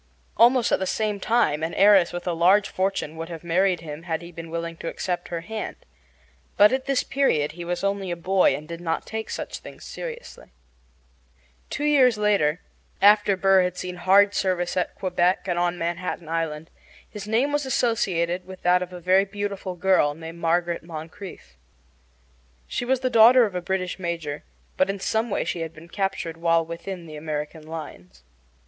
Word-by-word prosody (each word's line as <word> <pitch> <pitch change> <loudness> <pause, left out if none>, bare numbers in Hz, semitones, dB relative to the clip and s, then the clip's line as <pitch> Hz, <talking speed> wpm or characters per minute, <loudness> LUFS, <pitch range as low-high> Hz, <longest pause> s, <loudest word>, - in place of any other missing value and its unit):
Almost 240 0 +4
at - - +3
the 190 - -2
same 210 -1 -1
time 190 -9 +1
an 160 +1 -3
heiress 195 -3 +6
with 175 0 -6
a 175 - 0
large 185 +5 +4
fortune 185 -5 -2
would 165 +1 -6
have 165 -1 -8
married 180 +1 +1
him 150 -1 -7
had 165 -1 -3
he 170 - -10
been 165 0 -9
willing 170 0 -4
to 165 - -7
accept 180 +1 -3
her 170 -1 -4
hand. 220 +5 -5 0.8
But 205 +1 +7
at 260 0 -1
this 275 -2 +1
period 155 - +1
he 175 +2 -8
was 175 +2 -3
only 200 -1 -1
a 175 - -2
boy 185 +2 +2
and 150 +1 -8
did 170 +1 -7
not 165 -1 -2
take 220 0 -5
such - - -5
things - - -12
seriously. 485 - -8 1.2
Two - - -4
years 265 -6 +4
later, 200 -6 +2 0.4
after 205 -1 +5
Burr 195 0 +5
had 180 0 -1
seen 180 -1 -5
hard 200 +3 +5
service 180 -3 0
at 180 - -1
Quebec 180 0 0
and 175 -1 0
on 175 0 0
Manhattan 170 0 -3
Island, 160 -1 -3 0.4
his 205 -1 -8
name 240 +7 +1
was 290 -2 0
associated 185 -9 0
with 185 -1 -11
that 180 +1 +4
of 180 0 -5
a 180 - -8
very 185 +3 +3
beautiful 200 -2 -4
girl 180 -5 +2
named 165 +1 -9
Margaret 170 +1 0
Moncrieffe. 160 - -10 1.1
She 245 - -3
was 260 +1 +1
the 255 -1 0
daughter 235 +2 +7
of 205 - -5
a 180 - -2
British 185 0 -2
major, 165 -5 -4 0.3
but 185 - +2
in 195 0 -2
some 220 +4 0
way - - 0
she 170 - -3
had 165 0 -5
been 165 +2 -13
captured 180 -4 -3
while 165 0 +2
within 170 +2 -7
the 155 -2 -9
American 155 +1 -5
lines. 155 - -9
180 Hz, 185 wpm, -24 LUFS, 165-200 Hz, 1.2 s, But